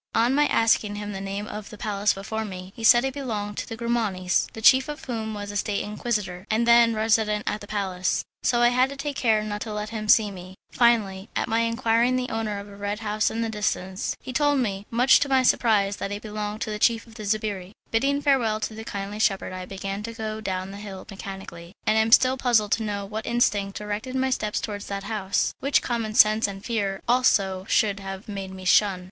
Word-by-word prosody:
On 235 +3 +3
my 295 +1 +4
asking 220 -2 +2
him 205 0 -5
the 195 -1 -5
name 195 +1 -4
of 210 -1 -8
a 215 - -10
palace 205 -1 0
before 220 +3 -4
me, 185 -2 -8
he 225 - -9
said 240 +3 +6
it 265 - -2
belonged 215 -7 -4
to - - -5
the 225 - -6
Grimanis, 220 -6 0
the - - -8
chief 260 +5 +5
of 295 - -7
whom 220 -3 -4
was 205 0 -5
a 205 - -3
State 200 0 -1
Inquisitor, 210 -4 -3
and 225 +2 +1
then 235 -1 +6
resident 215 -1 +1
at 210 - -2
the 205 - -10
palace, 190 -3 -1 0.2
so 240 -1 +2
I 240 - +6
had 250 +2 +2
to 280 - -7
take 280 0 -4
care 220 -4 +2
not 210 -1 -4
to 220 - -5
let 210 0 -4
him 215 -2 -5
see 210 -2 +5
me. 185 0 -10 0.2
Finally, 210 -5 +2
an - - 0
my 225 +1 +1
enquiring 230 +1 +2
the 255 0 -1
owner 220 -2 -2
of 200 0 -7
a 200 - -12
red 205 +2 -4
house 215 0 0
in 225 - -3
the - - -1
distance, 200 -2 -2
he 255 - -6
told 290 +2 +2
me, 205 -5 -2
much 245 +3 +5
to 285 - -1
my 265 -1 +4
surprise, 205 -5 +2
that 200 - -4
it 205 +1 -5
belonged 210 0 -5
to 215 - -2
the 210 - -4
chief 230 0 +2
of 230 - -16
the 215 - -9
sbirri. 205 -3 -2 0.2
Bidding 280 +5 +1
farewell 245 -7 +2
to 220 - -3
the 220 +1 -8
kindly 205 -1 -5
shepherd 195 -3 +1
I 185 0 -6
began 195 +1 -5
to 230 +2 -6
go 220 -1 -5
down 190 -2 -3
the 200 - -8
hill 200 -2 -8
mechanically, 190 -3 -9
and 215 - +3
I 220 - +5
am 220 +1 0
still 255 +2 +6
puzzled 230 -5 +2
to 225 - +2
know 205 -2 -3
what 215 +2 -6
instinct 205 -4 +1
directed 210 +5 -4
my 260 0 +1
steps 210 -4 -1
towards 205 -1 -5
that 200 0 -4
house, 200 -2 -1
which 280 +1 +2
common 230 -3 -2
sense 215 +1 +5
and 195 0 -8
fear 200 -5 -2
also 200 -7 +2
should 200 -2 +2
have 195 +1 -7
made 195 -2 -5
me 190 0 -10
shun. 195 0 +4
215 Hz, 235 wpm, -25 LUFS, 200-230 Hz, 0.2 s, said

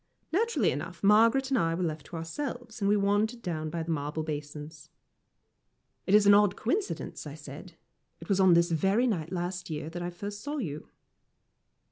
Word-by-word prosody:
Naturally 365 - +2
enough, 170 +7 -6
Margaret 230 +6 +5
and 260 - +3
I 165 0 +1
were 180 - -2
left 155 -3 -3
to - - -9
ourselves, 240 - -5
and 200 - +2
we 210 - +4
wandered 205 +4 +1
down 155 -3 -3
by 165 +1 -3
the 165 - -3
marble 150 +1 -2
basins. 150 0 -7 1.2
"It 195 - +5
is 210 -1 +6
an 200 - +8
odd 205 -1 +5
coincidence," 380 - -3
I - - -7
said; - - -10 0.5
"it - - -11
was 195 -3 +1
on 190 -2 +6
this 170 0 +3
very 195 +9 +2
night 175 -8 -1
last 180 0 -3
year 155 0 -4
that 175 +1 -5
I 175 - -2
first 205 +4 -7
saw 295 +4 -4
you." 155 - -5
185 Hz, 185 wpm, -29 LUFS, 160-215 Hz, 1.2 s, an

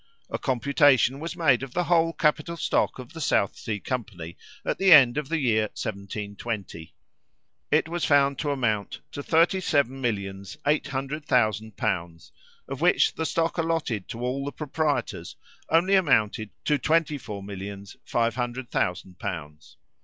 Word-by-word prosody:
A - - -2
computation 135 0 +3
was 170 +3 -5
made 140 -8 +3
of 135 -2 -8
the 180 - +2
whole 165 -1 +3
capital 155 +1 0
stock - - 0
of 125 -2 -10
the 165 - -7
South 100 -8 +1
Sea 105 -2 -4
company 95 -9 -5 0.3
at - - -1
the 195 -1 +4
end 130 -7 +8
of 150 -2 -3
the 165 - +1
year 115 -7 +2
1720. 100 -3 -5 0.7
It 155 +1 +3
was 170 +1 -3
found 140 -1 +3
to 150 - -1
amount 115 -7 -1
to 145 - -5
thirty 165 +5 +3
seven 135 -5 +1
millions 100 -4 -3
eight 150 +1 +2
hundred 140 +3 -4
thousand 110 -4 +1
pounds, 85 -2 -3 0.4
of - - -6
which - - +4
the 160 - -2
stock 165 +3 -1
allotted 160 - -1
to 115 - -7
all 130 +3 -2
the 140 - -4
proprietors 150 0 -2 0.3
only 170 +4 +3
amounted 110 - +2 0.2
to 150 -2 +2
twenty 155 +1 +1
four 105 -5 -7
millions 100 0 -8
five 115 -1 0
hundred 120 +1 -4
thousand 90 0 -2
pounds. 75 -3 -7
130 Hz, 160 wpm, -26 LUFS, 105-150 Hz, 0.7 s, end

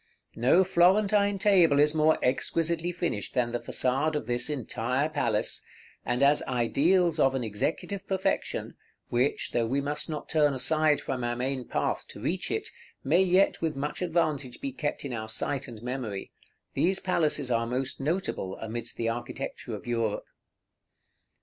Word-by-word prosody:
No 130 +11 +4
Florentine 200 +3 +3
table 185 -7 +4
is 150 +1 +4
more 155 0 +4
exquisitely 165 +6 0
finished 170 - -3
than 120 -2 +1
the 120 - -1
façade 135 +7 0
of 150 - -2
this 120 +4 0
entire 130 +1 -1
palace; 120 -9 0 0.4
and 120 +2 0
as 145 +1 +5
ideals 155 +8 +2
of 135 -2 +4
an 130 - -1
executive 150 - -3
perfection, 190 -1 -1 0.4
which, 125 +4 0
though 115 -1 +1
we 135 +4 0
must 145 +3 -1
not 155 -1 -5
turn 150 -3 +2
aside 155 +3 +2
from 130 -2 -3
our 120 0 -1
main 130 +1 -3
path - - -1
to - - -10
reach - - -2
it, - - -2 0.3
may 165 +7 +4
yet 190 +1 +3
with 160 -3 -1
much 145 +5 -4
advantage 155 -7 -1
be 275 0 -4
kept 150 - -3
in 135 - -4
our 110 -1 -5
sight 135 +5 -2
and 115 -2 -10
memory, 120 -6 -4 0.4
these 190 +3 +2
palaces 155 -8 +1
are 115 0 +1
most 130 +2 -2
notable 145 - -2
amidst 115 +1 -5
the 115 - -1
architecture 120 +1 -4
of - - -10
Europe. 115 -3 -1
140 Hz, 160 wpm, -28 LUFS, 120-165 Hz, 0.4 s, as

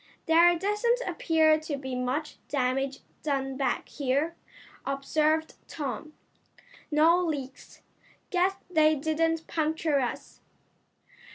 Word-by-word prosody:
"There 340 +2 +5
doesn't 420 +6 +1
appear 320 -3 +3
to 310 -2 -4
be 265 -1 -6
much 255 +5 -2
damage 270 0 -1 0.2
done 270 -3 -1
back 265 -2 -1
here," 285 +4 -1 0.5
observed 310 +3 0
Tom. 295 +1 -5 0.8
"No 325 +4 +4
leaks. 275 -5 -5 0.5
Guess 370 +1 +2
they 310 -3 +4
didn't 320 +2 0
puncture 315 -2 0
us." 250 -2 -4
310 Hz, 100 wpm, -28 LUFS, 275-325 Hz, 0.8 s, There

